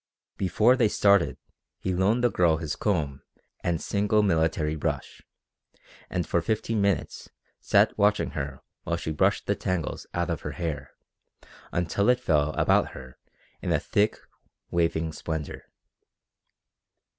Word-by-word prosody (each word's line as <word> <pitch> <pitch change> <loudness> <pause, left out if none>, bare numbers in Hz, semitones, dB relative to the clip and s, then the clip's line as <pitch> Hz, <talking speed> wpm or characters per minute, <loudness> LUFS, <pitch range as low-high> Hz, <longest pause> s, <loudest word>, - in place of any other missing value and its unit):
Before 105 +7 +3
they 120 -4 +3
started 100 -3 +3 0.4
he 95 - -2
loaned 100 +7 +2
the 120 - +4
girl 85 -4 +3
his 80 -2 -3
comb 75 -10 -1 0.4
and 85 -2 0
single 105 +3 +1
military 80 -4 +1
brush, 75 - -3 0.9
and 90 -2 -1
for 85 - +1
fifteen 110 +2 -1
minutes 100 -1 -1 0.3
sat - - +3
watching 105 +1 +3
her 70 -1 -5 0.2
while 85 +1 -2
she 80 - -4
brushed 75 - +1
the - - +2
tangles 90 -5 -3
out 85 0 0
of 80 - -3
her - - -5
hair 75 -5 -4 0.8
until 90 +5 +1
it 125 0 +4
fell 75 -10 +2
about - - +2
her 65 -1 -11 0.4
in - - -2
a - - +3
thick, 105 +1 +1 0.5
waving 80 -2 0
splendour. 80 -1 -5
85 Hz, 135 wpm, -27 LUFS, 80-100 Hz, 0.9 s, the